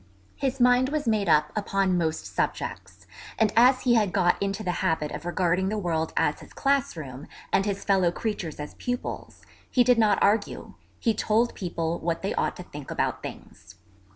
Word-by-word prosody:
His 270 -1 -2
mind 250 +1 +4
was 295 -3 -2
made 210 -5 +1
up 150 -1 +4
upon 195 -3 +1
most 160 -2 -1
subjects, - - -4 0.3
and 220 -2 +2
as 255 +3 +6
he 245 - +3
had 210 -5 +3
got 175 -2 +2
into 200 +2 -2
the 180 - 0
habit 155 -2 0
of - - -7
regarding 180 +1 +1
the 215 - -2
world 165 -5 -1
as - - +1
his - - -14
class 275 -8 0
room, 135 -2 -8 0.3
and 195 - +3
his 200 -1 -2
fellow 190 -3 +3
creatures 175 -7 -4
as 150 - -6
pupils, 245 0 -5 0.3
he 250 - +4
did 245 -1 +4
not 215 -2 +4
argue; 205 +1 0 0.3
he 225 - +2
told 220 +3 +1
people 170 -2 -3
what 165 +1 -2
they 195 - -1
ought - - -1
to 180 - -8
think 145 -5 -10
about - - -1
things. - - -10
195 Hz, 185 wpm, -26 LUFS, 170-230 Hz, 0.3 s, as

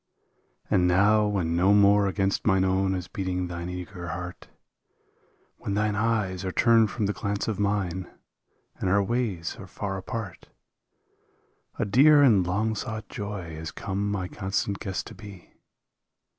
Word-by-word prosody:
And 90 -1 +3
now 105 +4 +4
when 90 -5 -1
no 95 +4 +4
more 100 0 +5
against 95 0 0
mine 95 -2 +4
own 95 0 +1
is 90 -1 -5
beating 90 -2 -3
thine 85 0 -5
eager 90 0 -7
heart. 90 +1 -6 1.1
When 100 - -4
thine 105 0 +1
eyes 105 -4 0
are 95 - -2
turned 115 +1 +4
from 105 0 -2
the 100 - 0
glance 100 0 -3
of 110 -3 -2
mine 95 -3 -1 0.7
and 95 - -1
our 100 +2 +3
ways 105 -7 -2
are 95 - -9
far 95 +1 -4
apart, 100 -1 -6 1.3
A - - 0
dear 145 +8 +6
and 100 -9 +4
long 105 +5 0
sought 110 0 -5
joy 100 -5 -6
has 80 +1 -6
come 100 +1 -3
my 95 -3 -2
constant 95 +1 -2
guest 95 -3 -4
to - - -10
be. 100 -5 -12
100 Hz, 155 wpm, -26 LUFS, 90-105 Hz, 1.3 s, dear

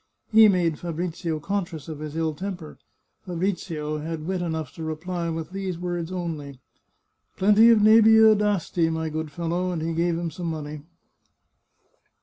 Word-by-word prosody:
He 220 0 +8
made 175 -6 +1
Fabrizio 170 -1 -3
conscious 175 -3 -4
of 155 -2 -7
his 155 0 -6
ill 160 -1 -1
temper. 180 -1 -7 0.4
Fabrizio 170 -4 -3
had 155 0 -5
wit 185 0 -2
enough 160 -2 -3
to 165 - -8
reply 170 +2 -3
with 165 +1 -5
these 190 -2 -4
words 175 -1 -4
only, 155 -7 -5 0.4
" - - -48
Plenty 210 +4 +6
of 220 -3 +5
nebieu 220 0 +7
d'Asti, 200 -5 0
my 160 0 -2
good 155 0 -4
fellow," 175 +2 -2
and 165 -3 -3
he 165 0 -2
gave 170 0 0
him 170 -1 -3
some 170 +2 -5
money. 150 -2 -5
170 Hz, 155 wpm, -25 LUFS, 160-185 Hz, 0.4 s, He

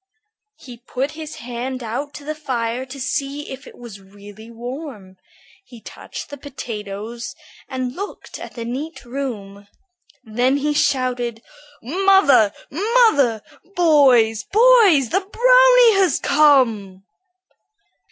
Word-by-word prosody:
He 245 -2 -12
put 270 +3 -3
his 310 0 -8
hand 250 +2 -6
out 245 +6 -4
to 290 - -10
the 305 - -3
fire 255 -4 -4
to 270 +2 -10
see 280 +2 -3
if 265 0 -9
it - - -14
was 230 -5 -11
really 205 +3 -14
warm. 235 -5 -9 0.5
He 245 -11 -15
touched - - -10
the 285 - -7
potatoes 230 -4 -7 0.3
and 255 -1 -4
looked 400 +2 -8
at - - -10
the 230 -2 -6
neat 275 +7 -6
room. 215 -6 -6 0.6
Then 245 +4 0
he 295 +1 -1
shouted, 250 -5 -1 0.4
"Mother, 320 - +4 0.2
mother! 330 - +2 0.3
boys, 260 -10 +4
boys, 420 - +5
the 385 - +1
brownie - - +5
has 370 - +2
come!" 230 -10 +2
260 Hz, 120 wpm, -20 LUFS, 230-305 Hz, 0.6 s, boys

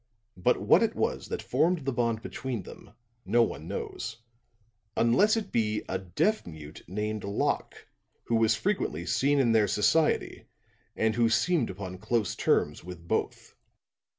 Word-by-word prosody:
But 90 - +2
what - - +5
it - - +1
was - - -1
that - - -4
formed 155 +3 +1
the 135 - 0
bond 115 -2 0
between 125 -7 -4
them, - - -13 0.3
no 115 +4 +3
one - - -4
knows, 110 - -5 0.8
unless 195 - +4
it 220 - -4
be 105 -2 0
a 95 - -2
deaf 145 - 0
mute 80 -2 -10
named 105 +3 -3
Locke, 100 +1 -2 0.4
who - - -3
was 110 0 +3
frequently 110 - -1
seen 135 +7 +2
in 120 -4 +3
their 110 -2 +4
society 150 - +1 0.5
and 110 0 +1
who 115 0 +3
seemed 170 +8 +2
upon 95 -1 -7
close 110 +1 -1
terms 75 - +1
with 85 -1 -10
both. - - -2
110 Hz, 150 wpm, -28 LUFS, 95-130 Hz, 0.8 s, what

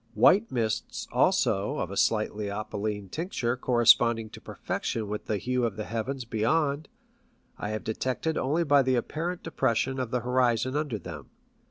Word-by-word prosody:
White 190 - +5
mists 110 -3 -2
also 100 +1 +2
of 90 - -3
a - - -5
slightly 105 -1 +1
opaline 105 0 -3
tincture 125 - -2
corresponding 120 -2 +4
to - - -11
perfection 110 -2 -3
with 105 +1 -4
the 105 - 0
hue 125 +4 -1
of 115 -4 0
the 105 - -4
heavens 115 +4 -3
beyond, 140 +7 0 0.7
I 105 - -3
have 110 0 -3
detected 130 +8 -2
only 155 +6 +1
by 145 -3 +5
the 130 -1 +2
apparent 165 +8 -3
depression 130 -3 0
of 130 -3 -2
the 125 0 -1
horizon 125 +1 +1
under 145 -7 -1
them. 95 - -9
120 Hz, 160 wpm, -28 LUFS, 110-135 Hz, 0.7 s, White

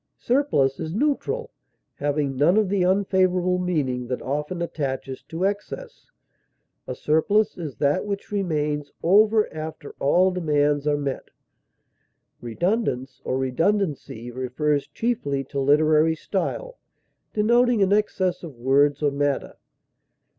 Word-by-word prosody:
Surplus 150 - +1
is 160 +3 -4
neutral, 300 - -1 0.4
having 145 -1 -1
none 155 +9 +3
of 215 -3 +2
the 195 -2 +1
unfavorable 185 -1 +2
meaning 140 -9 -1
that 125 0 -2
often 150 +6 -3
attaches 135 -5 -4
to 165 +3 -5
excess; 325 - -5 0.8
a - - -4
surplus 200 +8 +2
is 155 -7 -6
that 145 0 +1
which 200 0 -5
remains 150 -7 -1
over 210 +4 +4
after 155 -2 -7
all 180 +7 +3
demands 150 -4 +1
are 145 -1 +2
met. 140 -2 -4 1.1
Redundance 135 - -2
or 130 - -1
redundancy 135 - -1
refers 130 +4 -1
chiefly 220 - -2
to 140 +1 -5
literary 155 +3 +4
style, - - -3 0.6
denoting 235 +1 +3
an 195 +1 +3
excess 190 -4 0
of 160 -6 -9
words 140 +4 +2
or 145 - +3
matter. 140 0 -1
155 Hz, 120 wpm, -24 LUFS, 140-200 Hz, 1.1 s, over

